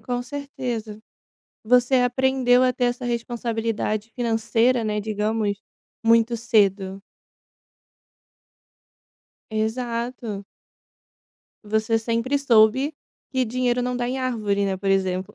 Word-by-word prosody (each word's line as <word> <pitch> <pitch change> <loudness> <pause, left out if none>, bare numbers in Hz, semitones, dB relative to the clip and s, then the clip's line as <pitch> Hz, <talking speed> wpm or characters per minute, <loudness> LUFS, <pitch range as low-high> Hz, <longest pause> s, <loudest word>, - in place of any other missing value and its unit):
com 245 -1 -3
certeza. 245 -6 -5 0.6
Você 250 +3 +4
aprendeu 250 0 +3
a 255 -1 +2
ter 245 - 0
essa 245 +1 -2
responsabilidade 230 -2 -2
financeira, 235 +1 +1
né, 210 -1 -1
digamos, 210 0 -1 0.4
muito 230 +1 +4
cedo. 200 -4 +1 2.5
Exato. 230 -1 -3 1.2
Você 220 +2 +1
sempre 230 +5 0
soube 260 +3 +4 0.4
que 260 -2 +1
dinheiro 245 +1 0
não 250 0 -2
dá 245 0 -1
em 260 +1 -2
árvore, 215 -6 0
né, 195 -1 -1
por 195 +1 -3
exemplo. 190 -1 0
230 Hz, 100 wpm, -23 LUFS, 215-250 Hz, 2.5 s, Você